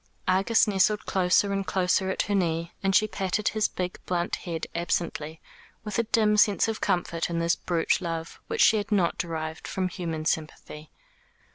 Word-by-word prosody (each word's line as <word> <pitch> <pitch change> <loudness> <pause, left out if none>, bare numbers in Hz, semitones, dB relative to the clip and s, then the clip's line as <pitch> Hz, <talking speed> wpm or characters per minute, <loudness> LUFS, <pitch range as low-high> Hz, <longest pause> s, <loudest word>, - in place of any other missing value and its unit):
Argus 195 +6 +3
nestled 210 +1 +2
closer 190 +2 +2
and 195 -1 -2
closer 190 0 +1
at 190 - 0
her 205 - -2
knee, 170 -3 0
and 195 -1 +1
she 215 - +5
patted 200 0 -1
his 215 -1 +1
big 180 -1 -4
blunt 175 -1 -1
head 170 -3 -5
absently, 165 -2 -2 0.4
with 210 0 -3
a - - +3
dim 210 -2 +3
sense 205 0 +4
of 225 -1 -3
comfort 170 -2 -1
in 170 - -2
this 170 +1 +2
brute 170 0 0
love, 165 -2 -5
which - - -1
she 220 - +6
had 205 +1 -4
not 185 -5 +1
derived 160 -2 -4
from 185 -1 -2
human 165 -3 -4
sympathy. 155 -1 -4
180 Hz, 175 wpm, -26 LUFS, 165-200 Hz, 0.4 s, she